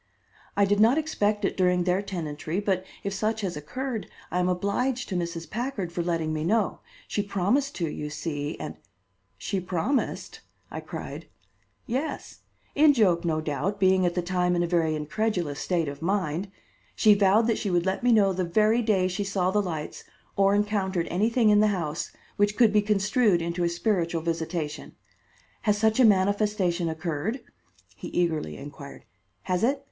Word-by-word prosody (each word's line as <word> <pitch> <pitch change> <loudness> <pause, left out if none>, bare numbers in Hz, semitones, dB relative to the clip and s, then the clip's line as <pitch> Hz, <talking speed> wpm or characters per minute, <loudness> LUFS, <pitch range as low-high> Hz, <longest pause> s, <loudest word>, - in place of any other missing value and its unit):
"I 200 - +5
did 205 +1 +1
not 230 +6 +5
expect 210 -10 0
it - - -1
during 180 -1 +2
their 180 +2 +1
tenantry, 165 -3 -4
but 195 -3 0 0.2
if 200 - -2
such 215 +2 -1
has 185 -5 -3
occurred, 230 - -4 0.2
I 180 - 0
am 180 0 +2
obliged 235 +8 -1
to 190 - -3
Mrs. 170 -1 -3
Packard 220 - -3
for 170 - -2
letting 165 -2 -1
me 155 0 -2
know. 210 +4 +1 0.3
She 205 - -1
promised 205 +8 0
to, 170 - -1
you 150 0 -5
see, 150 0 -4
and - - -6 0.3
" - - -45
"She 195 - 0
promised!" 185 - -2 0.3
I - - -5
cried. - - -7 0.6
"Yes; 265 +7 -4 0.3
in 300 0 +6
joke 185 -9 +3
no 160 -2 0
doubt, 170 +7 -2
being 190 -1 +4
at 175 -1 +1
the 180 - 0
time 180 0 +1
in 175 - +1
a - - 0
very 165 -2 +1
incredulous 155 -1 -2
state 170 -4 0
of 140 +1 -6
mind. 185 0 -1 0.5
She 215 -2 +6
vowed 205 +2 +4
that 230 -1 +1
she 205 - -2
would 175 -1 +1
let 190 0 -1
me 245 0 +3
know 200 -4 +4
the 185 0 -1
very 215 +6 +3
day 200 -5 +2
she 185 +2 -2
saw 190 -2 0
the 210 +1 +2
lights 160 -6 -5 0.3
or 195 0 +4
encountered 200 -4 0
anything 220 +4 +3
in 205 - +5
the 215 - +5
house, 170 -6 -2 0.3
which 205 +1 +2
could 230 -4 +5
be 210 - +5
construed 210 -1 +2
into 170 +1 -2
a 170 - +2
spiritual 170 -3 0
visitation. 165 -2 -3 0.7
Has 210 -2 +2
such 220 +2 +2
a 255 - +7
manifestation 200 -3 +2
occurred?" 160 - -3 0.5
he - - -8
eagerly 160 - -1
inquired. 140 0 -10 0.4
"Has 180 +1 -1
it? 270 +4 +2
190 Hz, 180 wpm, -26 LUFS, 170-210 Hz, 0.7 s, a